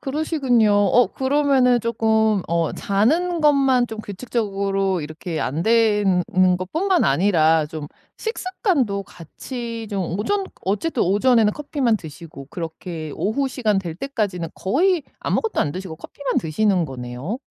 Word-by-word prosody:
그러시군요. 270 -6 +1
어 205 +3 +4
그러면은 265 -1 +2
쪼끔 220 -3 +1
어 170 -1 0
자는 320 - +1
것만 270 -4 +4
좀 220 - -7
규칙적으로 195 -3 -2
이렇게 155 +2 -5
안 155 +5 -2
되는 210 -5 +3
는 185 -1 +3
것뿐만 335 - 0
아니라 160 0 +3
좀 150 -2 -7 0.3
식습관도 365 - -1
같이 230 - -7
좀 190 -3 -2
오전 395 - 0 0.2
어쨌든 220 - 0
오전에는 210 +3 +3
커피만 275 -5 0
드시고 155 -4 -11
그렇게 165 -1 -6
오후 265 +7 0
시간 220 -6 0
될 175 -4 -5
때까지는 200 - -3
거의 335 - +1 0.2
아무것도 450 - -1
안 145 - 0
드시고 185 -2 -6
커피만 275 - -3
드시는 180 +2 +1
거네요. 130 - -6
210 Hz, 310 characters per minute, -21 LUFS, 180-260 Hz, 0.3 s, 어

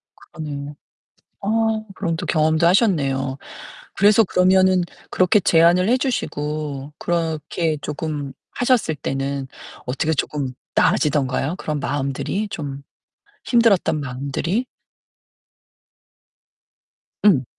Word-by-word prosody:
그러네요. 145 -2 -7 0.7
아, 200 - -4 0.5
그럼 170 -4 -2
또 175 +1 -5
경험도 160 +1 +2
하셨네요. 140 - +2 0.6
그래서 210 +2 +5
그러면은 185 0 +4 0.3
그렇게 185 +3 +3
제안을 175 +2 +4
해 245 - +4
주시고 150 - -3
그렇게 160 -2 -1
쪼금 150 -2 -4 0.2
하셨을 245 -10 +1
때는 135 -1 -3 0.4
어떻게 150 +6 0
쪼끔 140 -2 -2 0.2
나아지던가요? 145 +1 +1
그런 150 -5 -3
마음들이 145 +10 -2
좀 140 -6 -6 0.6
힘들었던 230 -10 +3
마음들이? 140 - -2 2.6
응. 140 - +5
155 Hz, 235 characters per minute, -21 LUFS, 140-185 Hz, 2.6 s, 그래서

